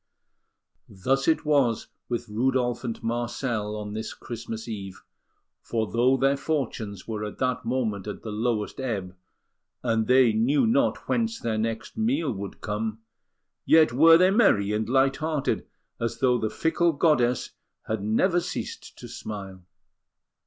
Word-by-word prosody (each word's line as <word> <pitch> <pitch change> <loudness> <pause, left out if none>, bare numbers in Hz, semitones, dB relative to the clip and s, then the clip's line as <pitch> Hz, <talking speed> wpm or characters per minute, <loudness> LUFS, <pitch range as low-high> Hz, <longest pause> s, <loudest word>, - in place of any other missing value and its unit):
Thus 135 +8 0
it 160 -1 +2
was 140 -7 +2 0.2
with 120 -1 -2
Rudolf 125 +2 0
and 115 -3 -5
Marcel 115 -2 -2
on 105 -1 -5
this 110 +1 -5
Christmas 115 -1 -7
Eve; 100 -4 -7 0.6
for 110 -2 -2
though 125 +3 +3
their 135 +1 +2
fortunes 120 -9 -3
were 110 -2 -3
at 105 - -6
that 125 -1 -1
moment 115 -5 -1
at 105 - -6
the 110 - -5
lowest 110 0 -2
ebb, 100 -8 -3 0.7
and 115 -2 +1
they 125 -3 +5
knew 125 - +3
not 265 +5 +1
whence 230 -1 0
their 110 -2 -1
next 115 - -3
meal 220 - +1
would 100 -2 -7
come, 110 +1 -3 0.6
yet 155 -6 +5
were 165 +5 +7
they 185 +2 +4
merry 105 - +4
and 110 +1 -1
light 135 +1 +3
hearted, 155 -3 -1 0.3
as 115 -1 -2
though 125 -2 +2
the 110 - -1
fickle 165 +4 +1
goddess 135 -6 +2 0.3
had 110 -2 -2
never 175 - +2
ceased - - -6
to - - -9
smile. 95 -3 -7
120 Hz, 145 wpm, -26 LUFS, 110-135 Hz, 0.7 s, were